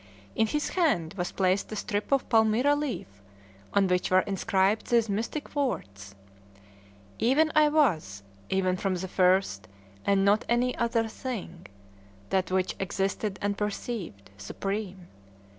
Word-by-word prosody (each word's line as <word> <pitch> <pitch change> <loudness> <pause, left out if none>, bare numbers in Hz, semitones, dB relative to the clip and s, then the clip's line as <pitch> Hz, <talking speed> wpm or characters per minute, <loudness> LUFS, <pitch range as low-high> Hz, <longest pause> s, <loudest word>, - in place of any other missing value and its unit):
In 220 - +2
his 295 +7 -1
hand 275 - +1
was 180 -3 -3
placed 190 +2 0
a - - -3
strip 205 +2 -3
of 275 -1 +2
palmyra 225 +4 +3
leaf, 245 - -5 0.5
on 200 -1 +3
which 180 -1 +1
were 185 0 +5
inscribed 195 +1 0
these 235 -2 +3
mystic 225 +10 -4
words: 100 - -3 1.0
"Even 295 +7 +3
I 305 -1 +6
was, 165 - +1 0.3
even 185 -1 +1
from 190 0 -1
the 185 +1 -4
first, 180 - +2 0.4
and 195 -1 +2
not 205 +2 +3
any 245 +1 +2
other 230 -1 0
thing: 215 -8 -6 0.6
that 190 -1 +1
which 185 0 0
existed 195 +1 -2
unperceived, 200 - -4
supreme. 195 - -4
200 Hz, 130 wpm, -28 LUFS, 185-235 Hz, 1.0 s, I